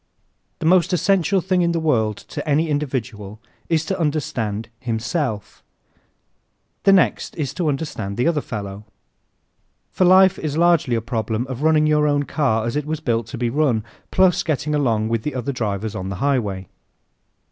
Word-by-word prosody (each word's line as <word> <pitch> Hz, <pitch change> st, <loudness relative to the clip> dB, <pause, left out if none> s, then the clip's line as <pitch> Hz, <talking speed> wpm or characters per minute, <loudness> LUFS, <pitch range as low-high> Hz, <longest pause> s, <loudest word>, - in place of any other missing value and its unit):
_ -, -, -49 dB
The -, -, -5 dB
most 180 Hz, +1 st, +4 dB
essential 190 Hz, +2 st, +2 dB
thing 185 Hz, 0 st, +1 dB
in 170 Hz, -1 st, +1 dB
the 165 Hz, -, 0 dB
world 110 Hz, -10 st, +1 dB
to -, -, -5 dB
any 155 Hz, +3 st, +2 dB
individual 120 Hz, -8 st, -3 dB, 0.3 s
is 160 Hz, -1 st, +1 dB
to 190 Hz, +2 st, -3 dB
understand 120 Hz, -9 st, -2 dB
himself. 115 Hz, -, -3 dB, 1.2 s
The 195 Hz, -, +7 dB
next 190 Hz, -2 st, +2 dB
is 145 Hz, -4 st, -3 dB
to 175 Hz, -3 st, -2 dB
understand 135 Hz, -9 st, -4 dB
the 120 Hz, -, +1 dB
other 160 Hz, -3 st, +1 dB
fellow. 100 Hz, -3 st, -6 dB, 1.1 s
For -, -, +1 dB
life 190 Hz, +1 st, +6 dB
is 155 Hz, -1 st, -3 dB
largely 170 Hz, -7 st, +3 dB
a 115 Hz, -, -1 dB
problem 115 Hz, +1 st, -2 dB
of 130 Hz, 0 st, -6 dB
running 155 Hz, 0 st, +4 dB
your 150 Hz, -1 st, +3 dB
own 145 Hz, -1 st, +2 dB
car 130 Hz, -7 st, 0 dB
as 115 Hz, -, -2 dB
it 150 Hz, 0 st, -2 dB
was 155 Hz, 0 st, -2 dB
built 115 Hz, -7 st, -1 dB
to 125 Hz, -, -7 dB
be 120 Hz, -1 st, -1 dB
run, 130 Hz, -6 st, +1 dB, 0.3 s
plus 185 Hz, -2 st, +3 dB
getting 150 Hz, -1 st, -1 dB
along 115 Hz, -7 st, +1 dB
with 115 Hz, -1 st, 0 dB
the 150 Hz, +3 st, -4 dB
other 125 Hz, +2 st, -2 dB
drivers 105 Hz, -4 st, -3 dB
on 95 Hz, -2 st, -5 dB
the 95 Hz, -, -4 dB
highway. 105 Hz, -6 st, -1 dB
140 Hz, 175 wpm, -21 LUFS, 110-160 Hz, 1.2 s, The